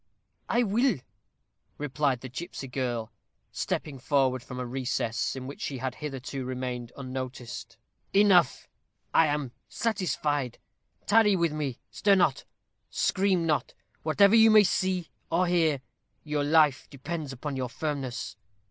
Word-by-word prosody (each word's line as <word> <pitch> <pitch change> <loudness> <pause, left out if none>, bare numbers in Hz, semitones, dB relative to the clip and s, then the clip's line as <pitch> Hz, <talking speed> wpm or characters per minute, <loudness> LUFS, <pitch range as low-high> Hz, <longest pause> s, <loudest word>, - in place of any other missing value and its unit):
"I 240 +1 +3
will," 235 +1 +2 0.8
replied 145 -3 0
the 130 - -7
gipsy 135 +1 -6
girl, 120 -3 -3 0.4
stepping 140 -3 -3
forward 130 -2 +2
from 125 0 -8
a 125 - -2
recess, 120 -2 -1
in 130 -1 -6
which 140 - -8
she 135 - -3
had 130 +1 -3
hitherto 135 -2 -5
remained 125 -2 -4
unnoticed. 125 -3 -6 0.3
"Enough. 195 -7 +4 0.5
I 165 - +6
am 145 -4 -1 0.2
satisfied. 150 - -1 0.5
Tarry 210 -1 +5
with 170 -3 +1
me. 145 -5 -3
Stir 200 -1 +3
not 155 -8 +2 0.4
scream 190 -3 +1
not, 155 -2 0 0.3
whatever 200 +6 +4
you 225 0 +8
may 215 -1 +8
see 185 -3 0 0.2
or 170 +2 +2
hear. 165 -6 +2 0.4
Your 150 -1 -1
life 150 -2 +4
depends 150 +1 -5
upon 135 +2 -5
your 130 -2 -2
firmness. 135 -4 -4
145 Hz, 130 wpm, -28 LUFS, 130-175 Hz, 0.8 s, you